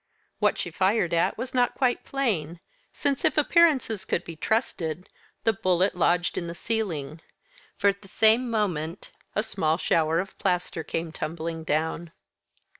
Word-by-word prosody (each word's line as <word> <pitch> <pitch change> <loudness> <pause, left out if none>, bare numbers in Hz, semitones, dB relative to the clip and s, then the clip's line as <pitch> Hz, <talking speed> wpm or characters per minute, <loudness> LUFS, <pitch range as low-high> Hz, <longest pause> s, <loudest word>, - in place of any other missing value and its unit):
What - - +2
she - - -4
fired 190 -2 +1
at 170 - +2
was 255 - -5
not 245 -1 +2
quite 250 -2 +1
plain, 180 - -1 0.3
since, 280 -2 -1
if 310 -3 +2
appearances 295 - +3
could 175 - -1
be 165 - -8
trusted, 175 - -1 0.4
the 225 - +3
bullet 185 -1 +2
lodged 175 0 +1
in 170 - -5
the 170 - -6
ceiling; 170 -8 -3 0.6
for, 200 - +4
at 200 0 -2
the 200 - -14
same 225 +5 +3
moment, 180 -6 -2 0.2
a 210 - +1
small 165 -8 0
shower 165 -2 +2
of 190 +2 -4
plaster 180 -3 -1
came 165 0 -3
tumbling 165 0 -4
down. 160 +2 -1
180 Hz, 155 wpm, -26 LUFS, 165-225 Hz, 0.6 s, for